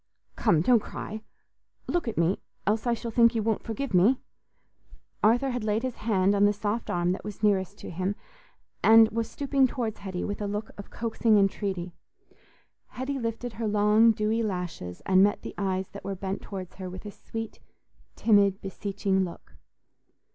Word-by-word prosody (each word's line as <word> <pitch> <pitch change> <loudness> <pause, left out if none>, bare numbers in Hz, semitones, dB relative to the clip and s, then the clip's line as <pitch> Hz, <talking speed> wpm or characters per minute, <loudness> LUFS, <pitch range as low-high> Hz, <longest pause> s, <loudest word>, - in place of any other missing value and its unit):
Come, 160 -3 +3
don't 235 +6 +5
cry; 215 +1 -7 0.6
look 345 -6 -1
at 230 - -3
me, 170 +4 +1 0.2
else 215 +4 0
I 240 - +3
shall 230 0 -6
think 235 +1 +5
you 220 - +1
won't 220 -1 0
forgive 230 +2 -4
me." 200 +9 +5 1.1
Arthur 245 +5 +4
had 245 -2 -3
laid 215 +2 0
his 255 -2 -3
hand 200 -3 +2
on 205 0 +4
the 205 - +4
soft 210 +2 -3
arm 175 0 +1
that 185 - -4
was 210 0 -8
nearest 200 -1 +2
to - - -8
him, 185 +4 -2 0.7
and 225 0 +7
was 230 +1 -2
stooping 275 -2 +2
towards 230 -4 -3
Hetty 190 -3 -4
with 205 +1 -4
a 205 - -1
look 210 +2 -4
of 200 - -10
coaxing 225 -1 +1
entreaty. 195 -3 0 0.9
Hetty 265 +2 -4
lifted 230 0 -3
her 225 +2 -3
long 210 +2 +5
dewy 215 +1 0
lashes, 180 - -4
and 185 0 +5
met 205 +1 +3
the - - -6
eyes 190 -1 -1
that 200 - -10
were 195 0 -3
bent 190 +1 -4
towards 190 -3 -8
her 185 -1 -6
with 185 +3 -9
a 205 - -6
sweet, 225 +3 -7 0.6
timid, 200 -3 +4
beseeching 195 0 -1
look. 175 -2 -8
210 Hz, 175 wpm, -27 LUFS, 190-225 Hz, 1.1 s, and